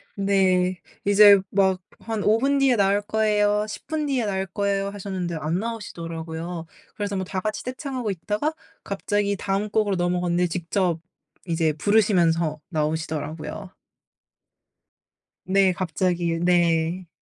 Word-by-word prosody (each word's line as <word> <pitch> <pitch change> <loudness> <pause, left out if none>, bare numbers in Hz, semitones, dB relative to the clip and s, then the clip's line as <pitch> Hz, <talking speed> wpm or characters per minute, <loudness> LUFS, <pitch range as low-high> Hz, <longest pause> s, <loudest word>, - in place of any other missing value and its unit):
네. 185 -2 +2 0.2
이제 205 0 +8
막 190 -1 +2 0.2
"한 220 -2 -3
5 215 +2 +4
분 280 +2 +2
뒤에 265 -3 +4
나올 200 0 +3
거예요. 210 -1 +1
10 215 - -8
분 310 -1 -1
뒤에 260 -5 0
나올 190 -1 -1
거예요." 200 +1 -1
하셨는데 190 -4 -4
안 160 +4 -1
나오시더라고요. 170 -6 -5 0.3
그래서 205 -1 -3
뭐 190 - -1
다 185 0 -3
같이 215 +1 -3
떼창하고 255 -4 -4
있다가 210 - -2 0.3
갑자기 200 0 -1
다음 195 +2 -2
곡으로 205 -2 +1
넘어갔는데 175 0 +1
직접 175 0 -1 0.5
이제 165 -3 +1
부르시면서 170 -4 +2
나오시더라고요. 155 +3 -3 1.8
네 190 0 +4
갑자기. 175 -1 -1
네. 175 0 +2
190 Hz, 280 characters per minute, -24 LUFS, 170-205 Hz, 1.8 s, 이제